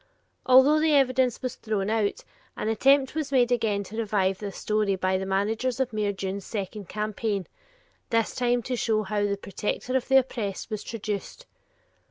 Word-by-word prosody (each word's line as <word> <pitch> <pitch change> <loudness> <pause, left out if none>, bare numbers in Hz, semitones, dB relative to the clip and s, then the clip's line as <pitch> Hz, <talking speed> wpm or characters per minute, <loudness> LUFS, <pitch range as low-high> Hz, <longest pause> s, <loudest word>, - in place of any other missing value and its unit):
Although 265 +4 +7
the 310 -1 +3
evidence 260 -2 +2
was 255 - -3
thrown 215 -2 -2
out, 215 -2 0 0.3
an 215 - -2
attempt 270 +4 +3
was 310 -3 -3
again 240 -5 +2
made - - -8
to 215 +4 -9
revive 200 -4 0
this 200 -2 -6
story 210 -2 0
by 185 0 0
the 190 - -4
managers 220 +6 0
of 255 -3 -1
Mayor 210 -1 0
Dunne's 195 0 -4
second 200 -2 -5
campaign, 210 -2 -2 0.6
this 230 -2 +1
time 245 -1 +1
to 250 - -2
show 220 -2 +1
how 205 +1 -1
"the 200 0 -1
protector 210 +6 -3
of 260 - 0
the 270 - +6
oppressed" 230 -6 -2
was 215 -1 -3
traduced. 215 - -5
220 Hz, 175 wpm, -26 LUFS, 200-255 Hz, 0.6 s, Although